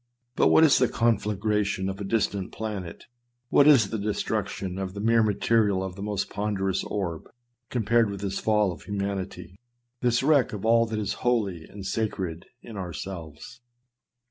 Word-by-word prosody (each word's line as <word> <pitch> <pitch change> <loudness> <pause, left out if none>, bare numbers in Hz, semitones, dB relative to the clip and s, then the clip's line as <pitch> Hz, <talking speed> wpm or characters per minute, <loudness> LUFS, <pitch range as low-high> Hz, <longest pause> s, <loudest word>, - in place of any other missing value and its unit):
But - - +4
what 160 - +6
is 155 - +6
the 125 - +4
conflagration 105 -3 0
of 95 +1 -4
a - - -2
distant 100 -2 -1
planet, 100 -6 -6 0.5
what 145 - +5
is 120 -10 +6
the 110 - -2
destruction 100 -2 -2
of 95 0 -4
the - - -5
mere 115 +2 +3
material 105 -2 +2
of 95 -1 -5
the 100 - -9
most 100 -1 -2
ponderous 95 -2 -1
orb, 85 -6 -4 0.4
compared 115 -1 +2
with 100 -1 -6
this 100 -1 -2
fall 105 -3 +2
of 85 - -9
humanity, 100 -2 -5 0.4
this 120 0 +2
wreck 140 -5 +3
of 105 0 -5
all 115 0 +4
that 110 0 -3
is 105 -2 -1
holy 100 -9 0
and 100 -1 -10
sacred 95 -6 -3 0.2
in 110 -3 -9
ourselves? 90 - -7
100 Hz, 165 wpm, -26 LUFS, 95-115 Hz, 0.5 s, what